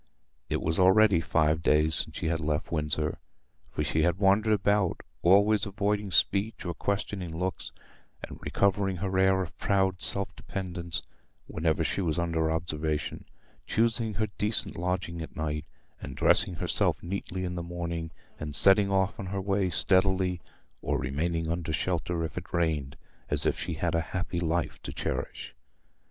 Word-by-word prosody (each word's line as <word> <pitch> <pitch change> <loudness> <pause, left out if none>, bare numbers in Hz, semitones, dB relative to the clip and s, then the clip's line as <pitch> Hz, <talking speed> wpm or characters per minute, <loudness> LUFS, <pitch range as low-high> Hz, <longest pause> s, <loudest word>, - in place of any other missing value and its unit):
It - - -1
was 80 +2 0
already 95 -1 +5
five 80 -1 +2
days 75 0 +3
since - - -2
she - - -4
had 80 0 0
left 75 0 -2
Windsor, 75 -1 -1 0.5
for 75 - -2
she 80 +1 0
had 85 +2 +2
wandered 105 +3 +4
about, 100 -2 +1 0.2
always 100 +4 +4
avoiding 100 +1 -1
speech 100 +4 +1
or 85 - -2
questioning 95 -3 -3
looks, 90 +2 -3 0.5
and - - -8
recovering 100 -1 +1
her 95 +1 -3
air 95 0 +4
of 85 - -9
proud 95 -2 +1
self 100 0 +4
dependence 90 -3 -5 0.4
whenever 80 -1 0
she - - -1
was 80 -4 0
under 80 -2 0
observation, 80 -2 -2 0.4
choosing 115 -1 +1
her 110 - +1
decent 105 +1 0
lodging 90 -1 -2
at 80 - -8
night, 75 -1 -3 0.4
and - - -7
dressing 90 - +3
herself - - 0
neatly 95 +1 -4
in 90 - -3
the 85 - -3
morning, 85 -1 -4 0.3
and 75 -2 -5
setting 100 +1 +5
off 95 0 +1
on 100 - -4
her 100 +1 -3
way 95 -1 0
steadily, 95 -1 +2 0.4
or - - 0
remaining 80 +3 -1
under 85 0 -2
shelter 85 +1 -1
if 80 - -3
it - - -16
rained, 80 -5 0 0.3
as - - 0
if - - +1
she - - -3
had - - -1
a 85 - +2
happy 90 +1 -3
life 85 0 -1
to - - -6
cherish. 65 - -4
90 Hz, 160 wpm, -28 LUFS, 80-95 Hz, 0.5 s, already